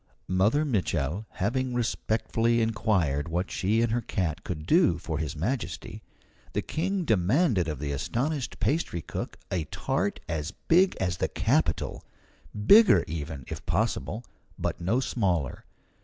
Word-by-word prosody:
Mother 105 - +2
Mitchel 100 - -1
having 125 +5 -1
respectfully 115 0 +1
inquired 100 -10 +1
what 90 +3 -2
she 110 +5 +1
and 115 - +1
her 120 +1 +1
cat 90 -7 -2
could 75 -4 -5
do 160 - +4
for 80 -3 -4
His 80 -1 -3
Majesty, 95 - -3 0.5
the - - -1
King 185 +2 -1
demanded 110 - +2
of 75 -2 -3
the 70 +1 -3
astonished 125 - -2
pastry 135 - 0
cook - - -5
a 85 -4 0
tart 100 +4 -1
as 80 0 -3
big 180 +3 +5
as 90 -2 -1
the - - 0
capitol 80 0 0 0.6
bigger 220 - +7
even, 75 -3 -5
if - - -6
possible, 115 +4 -1 0.3
but - - -3
no 110 +9 +1
smaller! 90 - -1
100 Hz, 140 wpm, -28 LUFS, 80-120 Hz, 0.6 s, bigger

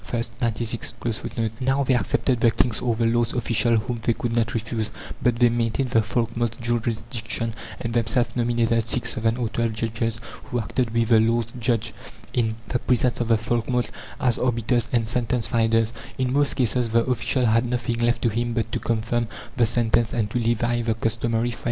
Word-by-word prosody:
(13) 120 -1 -3 1.3
Now, 135 +2 +2
they 130 - +2
accepted 125 0 +1
the 120 - +6
king's 115 -1 +1
or 120 -2 +1
the 115 +1 +1
lord's 115 0 +2
official 120 -1 +2
whom 115 +2 -2
they 115 - +2
could 115 +1 -3
not 115 0 0
refuse; 110 -1 -2 0.3
but 120 -1 +2
they 120 0 +5
maintained 120 +3 0
the 115 - +4
folkmote's 115 +1 -1
jurisdiction, 115 0 -2 0.3
and 115 -1 -3
themselves 120 +1 +1
nominated 115 -1 +1
six, 120 +1 +1
seven, 115 -1 0
or 120 -3 -1
twelve 115 0 -1
judges, 115 +1 -2 0.3
who 125 - -2
acted 120 +2 -1
with 115 0 0
the 115 -2 +6
lord's 115 +1 +1
judge, 115 -1 0 0.4
in 110 -2 +1
the 125 - 0
presence 125 0 +1
of 120 - 0
the 115 -1 +4
folkmote, 120 +2 -1 0.3
as 125 -5 +1
arbiters 120 -1 +1
and 115 -2 +1
sentence 120 0 0
finders. 115 0 +2 0.2
In 130 -1 0
most 145 0 +2
cases 125 -1 +1
the 115 +1 +3
official 125 +1 +1
had 115 +2 +3
nothing 120 -1 -1
left 120 0 +1
to 120 - +4
him 120 +1 -1
but 115 -1 -1
to - - -1
confirm 115 +1 -1 0.3
the 120 -3 +3
sentence 115 0 +1
and 105 -3 -1
to 120 - 0
levy 120 +1 +1
the 115 -1 0
customary 115 +1 0
fred. 115 - -9
115 Hz, 185 wpm, -24 LUFS, 115-120 Hz, 1.3 s, the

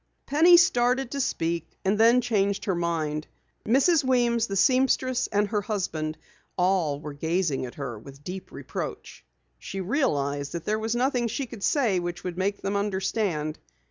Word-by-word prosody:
Penny 330 +5 +6
started 255 -6 +3
to 280 - -1
speak 165 - -1 0.2
and 195 +2 +3
then 230 +3 +5
changed 200 -4 0
her 195 - +1
mind. 160 -3 -2 0.4
Mrs. 280 +7 +4
Weems, 240 -3 +2
the 195 - -4
seamstress 255 +2 +2
and 205 0 +1
her 210 -2 0
husband, 170 -7 -3 0.4
all 180 -6 +1
were 150 -1 -7
gazing 160 -3 -1
at 120 - -11
her 125 -6 -5
with 140 +5 -13
deep 185 +3 -7
reproach. - - -7 0.4
She 195 - -6
realized 145 - -1
that 170 -1 -5
there 215 +1 0
was 225 +2 -1
nothing 245 -1 +1
she 270 +5 -3
could 230 -4 -10
say 225 -7 +2
which 175 0 -5
would 180 -2 -4
make 195 +2 -2
them 200 +1 -1
understand. 190 -6 -1
195 Hz, 165 wpm, -26 LUFS, 165-240 Hz, 0.4 s, Penny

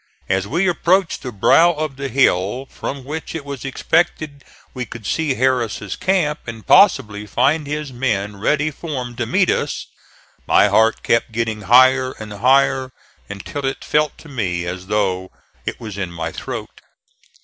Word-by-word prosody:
As 95 +1 0
we 175 - +1
approached 180 +1 +1
the 125 - -5
brow 165 - +4
of 155 -3 -4
the 140 0 -4
hill 120 -1 +1
from 135 -1 -6
which 155 +5 -6
it 155 -3 -5
was 140 -3 -6
expected 145 +1 -1 0.3
we 125 - -4
could 115 -2 -10
see 145 +6 0
Harris' 125 -3 0
camp, 175 -6 0
and 115 -3 -8
possibly 105 0 +4
find 140 +7 +1
his 150 -2 -4
men 105 -5 -2
ready 150 +8 +1
formed 130 -6 -6
to 120 - -1
meet 185 - +2
us, - - -2 0.6
my - - +5
heart 110 0 +3
kept 115 0 +1
getting 110 -1 -2
higher 130 +1 +5
and 110 -1 -9
higher 130 +3 +2 0.4
until 100 +8 -6
it 135 0 -3
felt 150 -1 +1
to - - -14
me 95 - -2
as 90 +1 -6
though 95 -3 0 0.4
it - - -3
was 105 -3 -7
in 95 -3 -3
my 85 -1 -4
throat. 115 -5 -7
130 Hz, 160 wpm, -19 LUFS, 105-145 Hz, 0.6 s, my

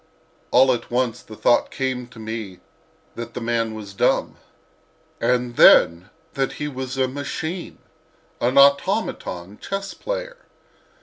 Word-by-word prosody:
All 130 +1 +5
at 120 -1 -5
once 120 -1 -1
the 110 - -12
thought 120 +3 +2
came 130 -2 -3
to 125 -1 -17
me 110 -4 -6 0.5
that 115 0 -8
the - - -2
man 115 -1 -1
was 105 -2 -8
dumb. - - +1 0.8
And 125 -1 0
then 85 +2 +6 0.2
that 135 -2 -1
he 150 - -4
was 130 -2 -5
a 130 -1 +2
machine—an 145 -2 -5
automaton 140 - +2
chess 195 0 -4
player! - - -6
125 Hz, 125 wpm, -22 LUFS, 115-140 Hz, 0.8 s, then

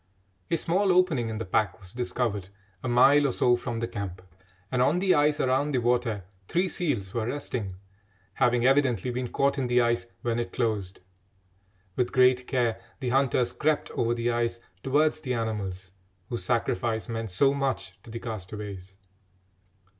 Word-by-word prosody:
A 170 - +2
small 190 +4 +2
opening 170 -11 +3
in 110 - -4
the 115 - -4
pack 100 +3 0
was 95 -1 -12
discovered 120 -5 -2 0.3
a - - -2
mile 140 +4 +6
or - - 0
so 120 0 +3
from 120 -1 -4
the 115 - -1
camp, 95 -4 -6 0.5
and 125 -1 +1
on 145 +7 +3
the 190 0 +3
ice 145 0 +3
around 135 +3 +1
the - - +2
water 120 -4 +1 0.2
three 180 +2 +1
seals 120 - -2
were 115 -2 -1
resting, 120 -8 -3 0.6
having 125 0 +2
evidently 130 -4 +3
been 125 +1 -2
caught 140 +3 +1
in 130 - 0
the 125 0 +3
ice 120 0 +1 0.2
when 120 -1 0
it 120 - -4
closed. 105 -6 -2 0.9
With 125 -1 0
great 125 0 +4
care 120 -3 0 0.2
the 130 -3 -2
hunters 130 -2 +2
crept 155 0 0
over 115 0 0
the 120 0 0
ice 120 0 -1 0.2
towards 150 +3 +2
the 130 -4 -2
animals, 100 -5 -3 0.4
whose 120 - -3
sacrifice 115 -1 0
meant 115 -2 -3
so 135 +10 +3
much 135 -9 -2
to - - -15
the 115 +1 -5
castaways. 100 -3 -7
120 Hz, 170 wpm, -27 LUFS, 110-135 Hz, 0.9 s, mile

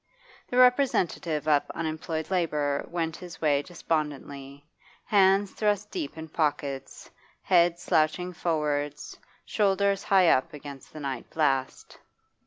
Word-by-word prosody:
The 250 - -2
representative 250 - +2
of 145 -2 +2
unemployed 160 +1 -4
labour 150 -6 0
went 165 -2 -2
his 175 -2 -10
way 145 -3 +2
despondently, 145 -3 -4 0.4
hands 195 -1 +4
thrust 210 -1 -1
deep 315 - -5
in 160 0 -7
pockets, 145 -4 -3 0.3
head 175 -2 +4
slouching 175 +2 0
forwards, 150 -4 -2 0.3
shoulders 200 -1 +1
high 190 -3 +5
up 130 - +2
against 140 -2 -10
the 155 - -9
night 135 -3 -5
blast. 135 -4 -1
160 Hz, 115 wpm, -27 LUFS, 145-185 Hz, 0.4 s, high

